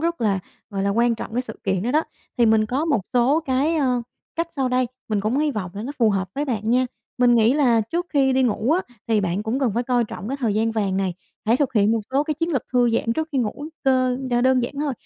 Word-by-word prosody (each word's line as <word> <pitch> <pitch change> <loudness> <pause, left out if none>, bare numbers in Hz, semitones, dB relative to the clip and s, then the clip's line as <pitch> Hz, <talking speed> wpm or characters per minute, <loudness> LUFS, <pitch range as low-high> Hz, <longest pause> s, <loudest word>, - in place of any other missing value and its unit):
rất 335 -1 -1
là, 205 -4 +2 0.3
gọi 195 -2 -2
là, 200 - +1
quan 235 +3 +2
trọng 220 - -7
cái 245 +2 0
sự 220 -4 -9
kiện 190 -2 0
đó 235 - -1
đó, 305 +4 +3 0.4
thì 235 - +5
mình 220 -1 +4
có 265 +7 -1
một 295 -9 +1
số 255 +5 +3
cái, 290 +2 +1
ơ, 255 -5 +1 0.3
cách 335 0 -1
sau 265 -2 +1
đây 250 0 +1 0.2
mình 210 -2 0
cũng 215 +6 0
hy 300 0 +2
vọng 205 -8 -4
là 205 - -5
nó 265 +5 -5
phù 225 -3 +4
hợp 190 -2 -1
với 285 - -1
bạn 225 -5 -2
nha. 255 +1 +3 0.3
Mình 245 -1 +5
nghĩ 230 +1 +4
là 250 -6 +4
trước 335 +11 -2
khi 270 -3 +3
đi 260 0 +3
ngủ 235 0 +1
á 330 -8 -2
thì 220 -2 +3
bạn 190 +1 -1
cũng 225 +4 -1
cần 265 -4 +1
phải 240 - +1
coi 245 -1 +1
trọng 210 -1 -7
cái 270 - -2
thời 225 -5 +1
gian 225 +1 +1
vàng 200 -4 0
này, 190 -2 -1 0.3
hãy 230 +2 +4
thực 275 -1 0
hiện 210 -1 +3
một 230 - +1
số 275 +3 +2
cái 305 - -1
chiến 330 +3 -2
lược 260 -5 0
thư 245 -1 +3
giãn 230 0 0
trước 315 +6 -2
khi 275 - +1
ngủ 250 +5 -2 0.2
cơ 255 -1 +3
đ - - +1
đơn 260 -1 +4
giản 240 - -4
thôi, 295 -2 0
245 Hz, 280 wpm, -22 LUFS, 220-270 Hz, 0.4 s, thì